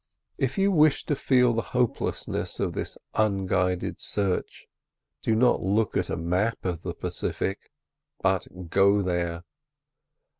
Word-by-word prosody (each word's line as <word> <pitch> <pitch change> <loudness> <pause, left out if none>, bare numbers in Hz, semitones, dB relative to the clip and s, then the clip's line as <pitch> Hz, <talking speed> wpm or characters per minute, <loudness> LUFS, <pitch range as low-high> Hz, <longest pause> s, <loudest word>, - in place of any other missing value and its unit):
If 135 0 0
you 195 +1 +3
wish 155 -4 +4
to 145 - 0
feel 125 -3 +3
the 115 - 0 0.2
hopelessness 125 -2 -1
of - - -1
this - - -4 0.2
unguided 95 -3 0
search, 100 -3 -2 0.6
do 110 - +1
not 125 +2 +3
look 100 +3 +1
at - - 0
a - - -2
map 90 +7 -1
of 90 -3 -2
the - - -5
Pacific, 95 - -3 0.5
but 95 -1 +1 0.2
go 100 +2 +4
there. 85 -1 -1
100 Hz, 135 wpm, -26 LUFS, 90-120 Hz, 0.6 s, wish